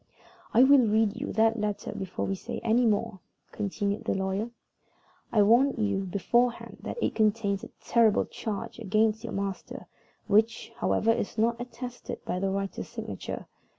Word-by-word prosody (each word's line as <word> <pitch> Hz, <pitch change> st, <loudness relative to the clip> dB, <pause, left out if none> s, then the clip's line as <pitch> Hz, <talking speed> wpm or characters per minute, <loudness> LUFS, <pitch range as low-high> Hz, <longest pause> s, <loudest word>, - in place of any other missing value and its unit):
"I 240 Hz, -, +6 dB
will 280 Hz, +1 st, +7 dB
read 215 Hz, 0 st, +2 dB
you 285 Hz, -, -3 dB
that 225 Hz, +1 st, +3 dB
letter 210 Hz, -1 st, -2 dB
before 190 Hz, -1 st, -4 dB
we 195 Hz, -, -1 dB
say 190 Hz, -, -5 dB
any 235 Hz, +1 st, +3 dB
more," 215 Hz, -1 st, 0 dB, 0.3 s
continued 200 Hz, 0 st, -2 dB
the -, -, 0 dB
lawyer. 190 Hz, +4 st, -1 dB, 0.8 s
"I 210 Hz, -3 st, +5 dB
warn 245 Hz, +6 st, +5 dB
you 200 Hz, -3 st, 0 dB
beforehand 235 Hz, +6 st, 0 dB
that -, -, -5 dB
it -, -, +1 dB
contains 210 Hz, -2 st, +1 dB
a -, -, -6 dB
terrible 230 Hz, -3 st, +3 dB
charge 210 Hz, +1 st, -5 dB
against 220 Hz, +1 st, +1 dB
your 230 Hz, -, -5 dB
master, 195 Hz, -1 st, -4 dB, 0.4 s
which, 220 Hz, +3 st, +2 dB
however, 225 Hz, -, +2 dB
is 225 Hz, -1 st, -2 dB
not 230 Hz, +2 st, +1 dB
attested 245 Hz, 0 st, -7 dB
by 180 Hz, -, -2 dB
the 195 Hz, +1 st, 0 dB
writer's 195 Hz, 0 st, -3 dB
signature. -, -, -6 dB
215 Hz, 155 wpm, -28 LUFS, 200-230 Hz, 0.8 s, will